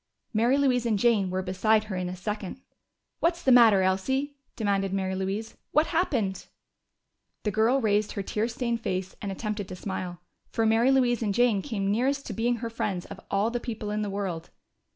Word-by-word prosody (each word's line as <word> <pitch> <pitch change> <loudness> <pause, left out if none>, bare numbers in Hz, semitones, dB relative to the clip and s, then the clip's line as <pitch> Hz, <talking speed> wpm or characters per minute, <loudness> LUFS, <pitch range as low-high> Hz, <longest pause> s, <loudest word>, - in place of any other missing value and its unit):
Mary 235 +5 +3
Louise 250 -4 +2
and 215 -3 +2
Jane 205 -3 +3
were 185 +1 -2
beside 215 +4 +2
her 215 -3 -5
in 180 -1 -2
a 180 - -5
second. 205 +3 -5 0.6
"What's 340 +1 +1
the 265 - +4
matter, 225 -6 +7
Elsie?" 265 +10 0 0.2
demanded 200 -3 0
Mary 190 -1 -1
Louise. 195 +4 -3 0.2
"What 305 +2 +4
happened?" 255 - -1 1.0
The 210 - 0
girl 225 +6 +3
raised 210 -3 +1
her 200 - -3
tear 215 +3 -1
stained 235 -1 -2
face 185 -2 -3
and 200 - -3
attempted 210 0 -4
to - - -7
smile. 180 -2 -5 0.3
For 225 - 0
Mary 225 +3 +4
Louise 250 -3 +3
and 205 -3 0
Jane 240 -4 +3
came 200 -6 -2
nearest 270 +6 0
to - - -5
being 240 +2 +1
her 230 0 -4
friends 190 -5 -2
of 200 - -9
all 200 +3 +1
the 240 - -1
people 220 -4 -5
in 210 0 -1
the 210 - -2
world. 190 -5 -4
215 Hz, 195 wpm, -27 LUFS, 195-240 Hz, 1.0 s, matter